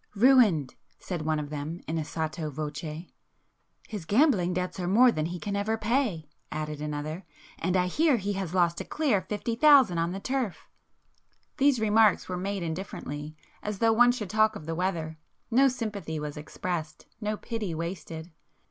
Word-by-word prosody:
"Ruined!" 210 - +5 0.2
said 175 -4 -5
one 155 0 0
of 145 0 -6
them 150 +3 -4
in 160 +1 -1
a - - -1
sotto 155 0 -3
voce. 155 +2 -5 0.8
"His 205 -7 -6
gambling 205 - +3
debts 180 +1 -3
are 175 - -2
more 240 +7 +6
than 155 -6 -1
he 175 +1 -5
can 200 +2 -3
ever 215 +2 0
pay"—added 155 - -2
another—"And 155 +4 -4
I 180 - +3
hear 295 - +3
he 205 -1 -2
has 190 -3 -4
lost 170 -2 +2
a - - -3
clear 275 -11 +1
fifty 210 +4 -3
thousand 265 - +6
on 165 +1 0
the 195 - -4
turf." 255 -3 -3 0.9
These 280 -3 +4
remarks 220 -1 +4
were 185 - -3
made 195 +1 -3
indifferently, 155 -3 -5 0.3
as 210 -1 -4
though 225 +2 +3
one 245 +2 +6
should 225 -6 -5
talk 215 0 +3
of 155 - -8
the 165 - -3
weather,—no 175 - 0
sympathy 210 - -3
was 150 -1 -5
expressed,—no 175 +7 -5
pity 215 -8 -4
wasted. 165 0 -6
180 Hz, 160 wpm, -28 LUFS, 160-220 Hz, 0.9 s, more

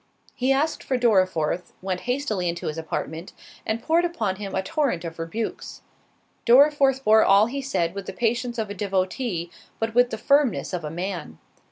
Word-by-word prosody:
He 255 +2 0
asked 295 +4 +1
for 260 - 0
Dorriforth, 185 -8 +1
went 185 -1 -3
hastily 225 -9 0
into 170 0 -5
his 155 - -3
apartment, 160 +1 -5 0.3
and 225 +1 -2
poured 330 +2 +3
upon 225 - -1
him 200 -1 -5
a 190 - 0
torrent 275 - -1
of 165 0 -7
rebukes. 210 +7 -5 0.6
Dorriforth 270 +1 +5
bore 220 -1 +6
all 200 +2 +6
he 275 +4 -4
said 180 -11 -1
with 200 -1 -7
the - - -5
patience 240 +1 -1
of 215 -3 -3
a - - -3
devotee, 190 -1 -2 0.3
but 225 0 -2
with 245 +1 +4
the 220 - -4
firmness 280 -3 +2
of 175 -2 -3
a 150 - -4
man. 175 - -5
215 Hz, 180 wpm, -24 LUFS, 180-255 Hz, 0.6 s, bore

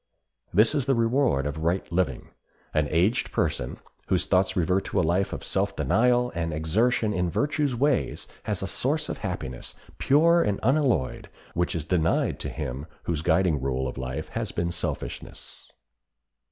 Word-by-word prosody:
This 110 - +4
is 140 -4 0
the 135 -1 +2
reward 115 - +2
of 75 +2 -3
right 85 +4 0
living. 90 +1 -1 0.4
An 75 -1 +2
aged 90 +8 +1
person - - -1 0.3
whose - - +2
thoughts 95 +2 +2
revert 90 +1 +2
to - - 0
a - - +3
life 90 +4 +1
of - - -5
self - - -1
denial 125 +5 +2
and 85 -1 -2
exertion 105 +8 +1
in 90 -2 0
virtue's 145 - 0
ways 140 +2 0 0.2
has - - -1
a - - -2
source 150 +4 -1
of - - -4
happiness, 75 - -5 0.2
pure 165 +5 +5
and 100 -7 0
unalloyed, 130 - +1 0.2
which 85 0 0
is 80 -3 -2
denied 85 -1 +1
to - - -4
him 65 +5 -5 0.2
whose 80 -3 -2
guiding 85 -3 +2
rule 65 0 -1
of 65 - -6
life 65 +4 -4
has - - -3
been 85 0 -1
selfishness. 85 - -5
90 Hz, 165 wpm, -26 LUFS, 80-120 Hz, 0.4 s, pure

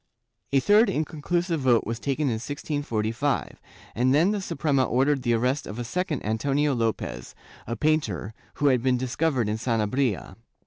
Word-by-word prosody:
A 140 - +4
third 205 - +5
inconclusive 165 +1 -1
vote 125 -4 +3
was 115 +1 -3
taken 140 +3 -1
in 135 -5 +1
1645, 145 -3 -2 0.3
and 130 +3 +2
then 170 +7 +4
the 210 -1 -1
Suprema 140 -6 0
ordered 135 +3 +2
the 120 -2 +1
arrest 125 +5 0
of 105 - -7
a 120 - -3
second 155 +3 -2
Antonio 140 +7 +1
Lopez, 110 - -3 0.3
a 115 - -2
painter, 110 - 0 0.2
who 145 - -2
had 125 -3 +2
been 130 0 +2
discovered 130 -1 0
in 105 +1 -1
Sanabria. 115 0 -1
130 Hz, 155 wpm, -26 LUFS, 115-150 Hz, 0.3 s, third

